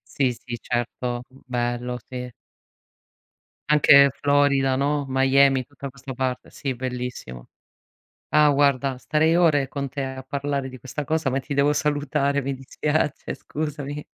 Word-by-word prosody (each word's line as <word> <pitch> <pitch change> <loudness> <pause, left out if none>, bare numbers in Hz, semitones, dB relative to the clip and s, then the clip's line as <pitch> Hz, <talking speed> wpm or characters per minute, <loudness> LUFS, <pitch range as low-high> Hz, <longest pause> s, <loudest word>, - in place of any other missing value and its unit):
Sì, 130 -3 +2
sì, 120 0 -7
certo, 120 0 -3
bello, 125 -1 -3
sì. 125 -1 -6 1.4
Anche 140 -2 +7
Florida, 140 -2 +3
no. 145 +1 0
Miami, 135 0 +4
tutta 140 -1 -9
questa 135 +1 -9
parte. 130 0 -3
Sì, 135 -2 -4
bellissimo. 125 - -6 0.8
Ah 150 -1 +5
guarda, 140 -2 +2
starei 155 +5 +2
ore 150 -6 +3
con 140 -1 -4
te 135 +2 -4
a 130 0 -5
parlare 140 0 -3
di 130 0 -10
questa 140 +4 -5
cosa, 160 -2 0
ma 130 - 0
ti 140 +2 -5
devo 140 +1 +3
salutare, 145 -1 0
mi 135 +1 -2
dispiace, 150 +3 -2
scusami. 150 -1 -5
135 Hz, 135 wpm, -24 LUFS, 130-145 Hz, 1.4 s, Anche